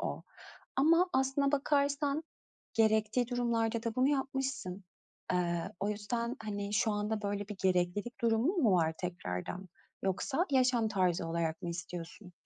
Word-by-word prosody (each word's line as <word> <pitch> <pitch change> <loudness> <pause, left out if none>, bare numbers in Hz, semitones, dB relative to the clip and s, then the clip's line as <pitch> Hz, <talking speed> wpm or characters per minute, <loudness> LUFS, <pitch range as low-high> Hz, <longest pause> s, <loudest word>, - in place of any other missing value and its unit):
o. - - -3 0.5
Ama 335 +6 +5
aslında 270 +2 +2
bakarsan 285 +1 +1 0.5
gerektiği 220 +2 +3
durumlarda 230 -2 0
da 230 -1 -2
bunu 255 +3 +3
yapmışsın. 270 -9 -2 0.5
Eee, 175 -2 0
o 200 - 0
yüzden, 235 +3 -2
hani, 205 -1 -3
şu 225 0 +3
anda, 210 +1 -1
böyle, 205 0 -2
bir 210 - -6
gereklilik 185 +5 0
durumun 235 - +2
mu 220 - +5
var 160 -2 +2
tekrardan? 175 - -4 0.4
Yoksa 265 - 0
yaşam 250 -3 +3
tarzı 185 -5 +1
olarak 165 -1 -1
mı 175 - -3
istiyorsun? 175 +2 -7
220 Hz, 135 wpm, -32 LUFS, 185-260 Hz, 0.5 s, Ama